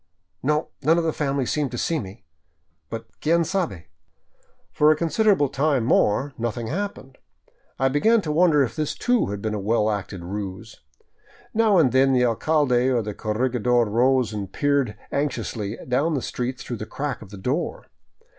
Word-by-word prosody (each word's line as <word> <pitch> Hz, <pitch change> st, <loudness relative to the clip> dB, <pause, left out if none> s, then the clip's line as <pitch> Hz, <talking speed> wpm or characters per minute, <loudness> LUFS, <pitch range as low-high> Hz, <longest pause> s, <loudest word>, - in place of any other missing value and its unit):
No, 150 Hz, +3 st, 0 dB
none 160 Hz, +4 st, +3 dB
of 170 Hz, -, +1 dB
the 160 Hz, -1 st, 0 dB
family 140 Hz, -2 st, -1 dB
seemed 145 Hz, +1 st, -1 dB
to 120 Hz, -, -6 dB
see 165 Hz, +6 st, 0 dB
me, 100 Hz, -, -9 dB, 0.6 s
but 115 Hz, 0 st, -6 dB, 0.2 s
quien 170 Hz, +2 st, +3 dB
sabe?" 160 Hz, -, -2 dB, 0.9 s
For 150 Hz, -, +4 dB
a 155 Hz, -, +5 dB
considerable 170 Hz, 0 st, +2 dB
time 140 Hz, -1 st, +1 dB
more 130 Hz, +4 st, +2 dB
nothing 120 Hz, 0 st, -2 dB
happened. 170 Hz, -7 st, -5 dB, 0.6 s
I 135 Hz, -, +2 dB
began 215 Hz, -, +3 dB
to 155 Hz, -, -3 dB
wonder 155 Hz, -2 st, +4 dB
if 125 Hz, -, -4 dB
this, 155 Hz, -2 st, -2 dB
too, 245 Hz, -1 st, +1 dB
had 100 Hz, 0 st, -5 dB
been 110 Hz, -1 st, -1 dB
a 105 Hz, -, -2 dB
well 105 Hz, +1 st, +1 dB
acted 100 Hz, -3 st, -5 dB
ruse. 100 Hz, +3 st, -6 dB, 0.7 s
Now 220 Hz, -3 st, +4 dB
and 145 Hz, -7 st, +4 dB
then 135 Hz, +1 st, +4 dB
the 125 Hz, -1 st, +4 dB
alcalde 130 Hz, +1 st, +2 dB
or 120 Hz, -3 st, +1 dB
the 105 Hz, 0 st, -4 dB
corregidor 120 Hz, +2 st, +1 dB
rose 120 Hz, +1 st, +2 dB
and 100 Hz, -2 st, -5 dB
peered 140 Hz, -6 st, 0 dB
anxiously 120 Hz, -7 st, -2 dB
down 140 Hz, +6 st, +1 dB
the 130 Hz, -, -2 dB
street 125 Hz, +1 st, -3 dB
through 120 Hz, -, -5 dB
the 110 Hz, -, -6 dB
crack 140 Hz, +2 st, -4 dB
of 105 Hz, -, -11 dB
the 100 Hz, -, -10 dB
door. 130 Hz, -, -2 dB
130 Hz, 175 wpm, -23 LUFS, 110-150 Hz, 0.9 s, a